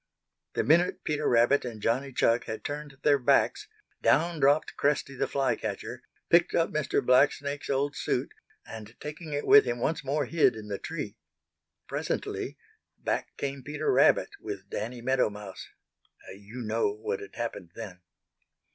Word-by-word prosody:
The -, -, +1 dB
minute 170 Hz, +4 st, +3 dB
Peter 150 Hz, -1 st, -1 dB
Rabbit 120 Hz, +4 st, +4 dB
and 120 Hz, -3 st, -6 dB
Johnny 130 Hz, +6 st, 0 dB
Chuck 120 Hz, -1 st, +2 dB
had 110 Hz, -1 st, -5 dB
turned 145 Hz, -1 st, -5 dB
their 145 Hz, -1 st, +4 dB
backs 270 Hz, -, +2 dB, 0.3 s
down 170 Hz, -1 st, +3 dB
dropped 145 Hz, +2 st, +3 dB
Cresty 140 Hz, -1 st, 0 dB
the 135 Hz, +1 st, -1 dB
Fly 135 Hz, 0 st, +1 dB
catcher, -, -, -5 dB, 0.3 s
picked 170 Hz, 0 st, +4 dB
up 165 Hz, -, +2 dB
Mr. 150 Hz, -4 st, 0 dB
Blacksnake's 140 Hz, +2 st, +2 dB
old 140 Hz, +1 st, 0 dB
suit, -, -, -1 dB, 0.3 s
and 110 Hz, +1 st, -10 dB
taking 150 Hz, +2 st, -7 dB
it 145 Hz, 0 st, -2 dB
with 210 Hz, +1 st, +8 dB
him, 120 Hz, 0 st, -1 dB
once 160 Hz, +6 st, -1 dB
more 140 Hz, +2 st, 0 dB
hid 150 Hz, -5 st, +3 dB
in 105 Hz, -1 st, -9 dB
the 100 Hz, -, -3 dB
tree. -, -, -5 dB, 0.7 s
Presently -, -, -3 dB, 0.4 s
back -, -, -3 dB
came 140 Hz, -1 st, -3 dB
Peter 150 Hz, +3 st, -1 dB
Rabbit -, -, +4 dB
with 100 Hz, -1 st, -7 dB
Danny 120 Hz, +3 st, -4 dB
Meadow 130 Hz, -2 st, +2 dB
Mouse. 105 Hz, -2 st, -9 dB, 0.7 s
You 105 Hz, +5 st, -9 dB
know 110 Hz, -1 st, +1 dB
what 105 Hz, -1 st, -4 dB
had 100 Hz, -, -11 dB
happened 110 Hz, -6 st, -4 dB
then. 95 Hz, -6 st, -8 dB
135 Hz, 155 wpm, -28 LUFS, 115-145 Hz, 0.7 s, with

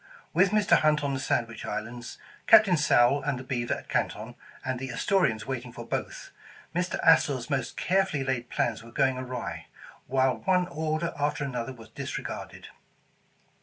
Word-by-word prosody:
With 185 Hz, +4 st, +4 dB
Mr. 210 Hz, +1 st, +4 dB
Hunt 150 Hz, -1 st, +2 dB
on 140 Hz, -1 st, 0 dB
the 135 Hz, -, -2 dB
Sandwich 115 Hz, -3 st, -1 dB
Islands, 120 Hz, +2 st, -5 dB, 0.3 s
Captain 215 Hz, -5 st, +7 dB
Sowle 140 Hz, -3 st, +4 dB
and 140 Hz, -1 st, -1 dB
the 130 Hz, -, -7 dB
Beaver 120 Hz, -2 st, -1 dB
at -, -, -10 dB
Canton, -, -, -2 dB, 0.3 s
and 130 Hz, -1 st, -2 dB
the 135 Hz, 0 st, -5 dB
Astorians 130 Hz, -, +1 dB
waiting 125 Hz, -2 st, -4 dB
for 120 Hz, -1 st, -9 dB
both, -, -, -4 dB, 0.4 s
Mr. 180 Hz, +1 st, 0 dB
Astor 150 Hz, -4 st, +5 dB
's 125 Hz, +5 st, -8 dB
most 135 Hz, -4 st, -2 dB
carefully 185 Hz, -6 st, +1 dB
laid 130 Hz, -2 st, -2 dB
plans 115 Hz, -2 st, -1 dB
were 115 Hz, -, -12 dB
going 130 Hz, +1 st, +1 dB
awry, 120 Hz, -, -5 dB, 0.4 s
while 130 Hz, 0 st, +2 dB
one 180 Hz, -1 st, +1 dB
order 155 Hz, +2 st, -2 dB
after 145 Hz, 0 st, 0 dB
another 125 Hz, -2 st, -3 dB
was 115 Hz, -4 st, -13 dB
disregarded. -, -, -6 dB
135 Hz, 165 wpm, -28 LUFS, 120-155 Hz, 0.4 s, Captain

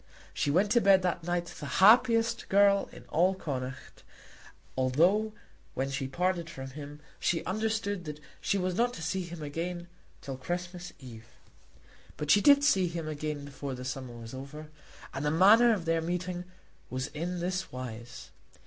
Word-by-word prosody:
She -, -, 0 dB
went 190 Hz, +8 st, +2 dB
to 240 Hz, 0 st, +5 dB
bed 195 Hz, -2 st, +5 dB
that 180 Hz, -2 st, -1 dB
night 175 Hz, 0 st, 0 dB
the 150 Hz, -, -8 dB
happiest 230 Hz, +2 st, +5 dB
girl 200 Hz, 0 st, +4 dB
in -, -, -12 dB
all 180 Hz, +4 st, +3 dB
Connaught, 130 Hz, -7 st, -6 dB, 0.7 s
although 170 Hz, +12 st, +3 dB, 0.4 s
when 135 Hz, +1 st, -1 dB
she 135 Hz, -1 st, -2 dB
parted 170 Hz, +4 st, -1 dB
from 135 Hz, -3 st, -8 dB
him 145 Hz, +1 st, -9 dB, 0.2 s
she 165 Hz, -, 0 dB
understood 205 Hz, -2 st, -1 dB
that 150 Hz, -1 st, -6 dB, 0.2 s
she 200 Hz, -, +1 dB
was 185 Hz, -1 st, -1 dB
not 240 Hz, +5 st, +1 dB
to 165 Hz, -, -7 dB
see 185 Hz, +4 st, -1 dB
him 170 Hz, -3 st, -7 dB
again 175 Hz, +4 st, -4 dB, 0.3 s
till 135 Hz, -2 st, -6 dB
Christmas 175 Hz, +5 st, -5 dB
Eve. 115 Hz, -5 st, -11 dB, 0.9 s
But 150 Hz, 0 st, 0 dB
she 205 Hz, -, +6 dB
did 285 Hz, +2 st, +6 dB
see 190 Hz, -11 st, +4 dB
him 165 Hz, -2 st, -4 dB
again 150 Hz, -1 st, -4 dB
before 140 Hz, -1 st, -6 dB
the 125 Hz, 0 st, -8 dB
summer 130 Hz, -2 st, -5 dB
was 115 Hz, 0 st, -9 dB
over, 150 Hz, +4 st, -8 dB, 0.4 s
and 135 Hz, -, -3 dB
the 150 Hz, -, +2 dB
manner 210 Hz, +9 st, +6 dB
of 195 Hz, -7 st, -1 dB
their 165 Hz, 0 st, +1 dB
meeting 180 Hz, +1 st, -3 dB, 0.4 s
was 130 Hz, +1 st, -2 dB
in 175 Hz, +4 st, -4 dB
this 180 Hz, +2 st, -2 dB
wise. 120 Hz, -2 st, -8 dB
170 Hz, 165 wpm, -30 LUFS, 140-190 Hz, 0.9 s, she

